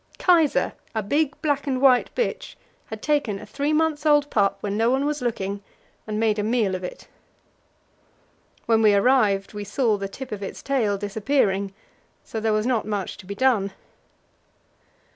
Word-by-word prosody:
Kaisa, 335 -5 +3 0.2
a 220 - 0
big 295 +7 0
black 285 -2 0
and 260 -2 0
white 255 -2 +4
bitch, 485 - -2 0.3
had 220 -1 -8
taken 285 -9 0
a 210 - -10
three 280 +8 -2
months 310 -1 +1
old 295 -2 +3
pup 200 -2 +2
when 205 -1 -2
no 225 +2 +2
one 265 +3 +1
was 295 -1 -2
looking, 200 -4 -3 0.5
and 215 0 -2
made 220 -1 +1
a - - 0
meal 215 -4 +1
off 185 - -5
it. 180 - -8 1.6
When 225 -1 +3
we 210 -2 +5
arrived 200 -3 +2
we 205 0 -5
saw 215 +1 +1
the 195 0 -5
tip 265 +6 -9
of 210 -1 -5
its 195 - -7
tail 230 -8 0
disappearing, 205 -1 0 0.5
so 220 - -5
there 220 0 0
was 215 0 +1
not 240 -4 0
much 205 -3 -3
to 185 - -13
be 200 - -5
done. 205 -5 +2
220 Hz, 175 wpm, -24 LUFS, 205-275 Hz, 1.6 s, we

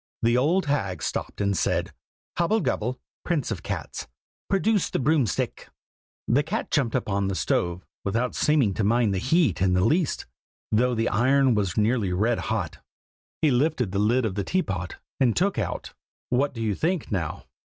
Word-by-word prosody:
The 120 +1 +4
old 160 +9 +2
hag 100 - -1
stopped - - -3
and 100 -1 +1
said - - 0 0.4
"Hobble 205 +6 +2
gobble, 125 +4 -1 0.2
prince 165 -7 -1
of - - -3
cats, - - -5 0.4
produce 200 0 +2
the - - -1
broom 145 -2 +2
stick!" 80 - -3 0.6
"The 130 +5 +4
cat 155 - -3
jumped 135 -7 +1
up - - -1
on 100 -1 0
the 95 - -1
stove, 90 0 -1 0.2
without 115 +5 -1
seeming 140 -10 +2
to 110 - -1
mind 115 0 +2
the 95 - 0
heat 130 - +2
in 95 -1 +3
the 90 +2 +3
least, 155 +5 +1 0.5
though 125 +3 +2
the 115 0 +1
iron 130 +4 +3
was 100 -5 -1
nearly 110 -2 +2
red 110 +6 +1
hot. - - -2 0.6
He 150 - +5
lifted 125 - +1
the 100 - -1
lid 115 +4 +2
of 105 - -1
the 100 +1 -2
teapot, 95 - -2 0.2
and 125 -5 +3
took 195 - +1
out 100 - -4 0.4
what 135 +2 +1
do 115 - -5
you 110 -2 +1
think, 165 - -1
now? 85 -7 -3
120 Hz, 180 wpm, -25 LUFS, 100-145 Hz, 0.6 s, He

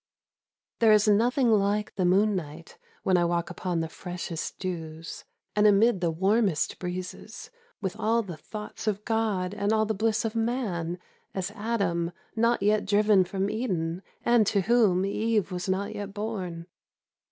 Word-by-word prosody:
There 225 -2 +6
is 210 0 +5
nothing 240 +4 +3
like 210 0 +1
the 185 - 0
moon 200 +4 +3
night 160 -1 -7 0.2
When 185 -1 +3
I 175 - +3
walk 170 0 -1
upon 175 -1 -2
the 165 - -2
freshest 175 0 -6
dews, 165 -3 -6 0.3
And 210 0 +5
amid 205 -1 +4
the 170 - +2
warmest 190 +1 +1
breezes. 180 0 -6 0.3
With 190 +1 -2
all 225 +1 +2
the 180 -5 -7
thought 210 +3 -8
of 210 0 -1
God 215 -5 0
And 205 0 -1
all 220 0 +3
the 220 - -1
bliss 220 +2 0
of 220 - -2
man, 220 -8 -1 0.4
as 190 0 -2
Adam 200 -6 -1 0.2
Not 230 -1 +2
yet 210 +1 +3
driven 205 -2 +4
from 190 +2 -2
Eden, 185 -7 -2 0.2
and 235 -3 +4
to 200 -2 +2
whorn^ 205 -4 +3
Eve 215 0 0
was 180 +1 -3
not 190 +2 -1
yet 205 0 -6
born. 190 -6 -4
200 Hz, 160 wpm, -27 LUFS, 180-220 Hz, 0.4 s, There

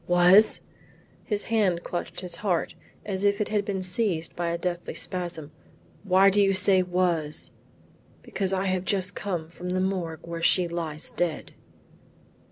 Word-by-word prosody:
"Was?" 180 +4 +5 0.6
His 210 -2 0
hand 195 -7 +1
clutched 175 - -4
his 175 -2 -3
heart 180 -5 -1 0.3
as 195 -1 -3
if 200 0 +2
it 210 - -1
had 210 -1 0
been 195 -2 -3
seized 180 -3 -1
by 170 -1 -2
a 170 - -1
deathly 175 0 -4
spasm. 175 -5 -3 0.5
"Why 195 0 +5
do 205 +1 +3
you 195 -1 +3
say 190 0 +5
was?" 175 -4 -1 0.7
"Because 195 -2 -2
I 190 0 0
have 185 -1 0
just 190 -1 0
come 175 -6 -3
from 180 +1 -7
the 185 +1 0
Morgue 185 -4 -3
where 170 0 -6
she 175 +1 +4
lies 165 -3 -3
dead." 170 -4 -2
180 Hz, 160 wpm, -26 LUFS, 170-195 Hz, 0.7 s, Was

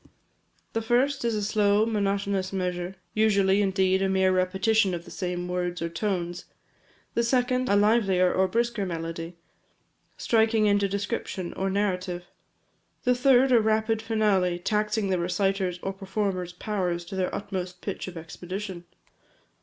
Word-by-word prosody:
The 225 - 0
first 250 +5 +1
is 230 -2 0
a 210 - -1
slow, 210 0 +3
monotonous 200 -3 -1
measure, 180 -1 -3 0.2
usually, 200 -2 +3
indeed, 190 -1 +2
a 195 - +1
mere 190 0 +3
repetition 190 +2 +2
of 170 0 -7
the - - -12
same 180 -1 -3
words 180 0 -2
or 170 - -2
tones; 175 -2 -3 0.7
the 235 - +2
second, 250 +1 +1
a 200 - +4
livelier 200 -4 +3
or 190 0 +2
brisker 235 +1 0
melody, 165 -1 -5 0.8
striking 220 -1 +2
into 200 -1 +3
description 195 -2 -3
or 195 0 -1
narrative; 185 -3 -1 0.8
the 250 - +4
third, 255 +1 +4
a 235 -2 +6
rapid 220 0 +1
finale, 210 -6 +1
taxing 210 +2 0
the 185 - +1
reciter's 185 +1 0
or 195 - -2
performer's 190 -2 -3
powers 180 -3 -2
to 185 - -7
their 185 -1 -1
utmost 185 -3 -5
pitch 200 - -5
of 180 -2 -8
expedition. 180 +3 -7
195 Hz, 145 wpm, -26 LUFS, 180-215 Hz, 0.8 s, a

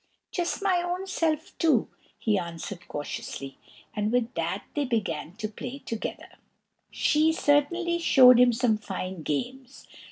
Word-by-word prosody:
"Just 350 +2 -2
my 370 -3 +3
own 355 +2 -3
self 320 -4 -1
too!" 305 -9 +3 0.3
he 215 -2 +1
answered 170 +1 -7
cautiously; 135 -2 -6 0.4
and 210 0 0
with 245 0 0
that 170 +4 -2
they 295 - 0
began 195 - -2
to 215 +1 -4
play 245 +5 -7
together. 230 -5 -6 0.5
She 310 +1 +2
certainly 340 +3 +2
showed 255 -6 +7
him 250 0 +6
some 230 -2 +1
fine 190 -3 -5
games. 250 - -4
245 Hz, 135 wpm, -27 LUFS, 200-310 Hz, 0.5 s, showed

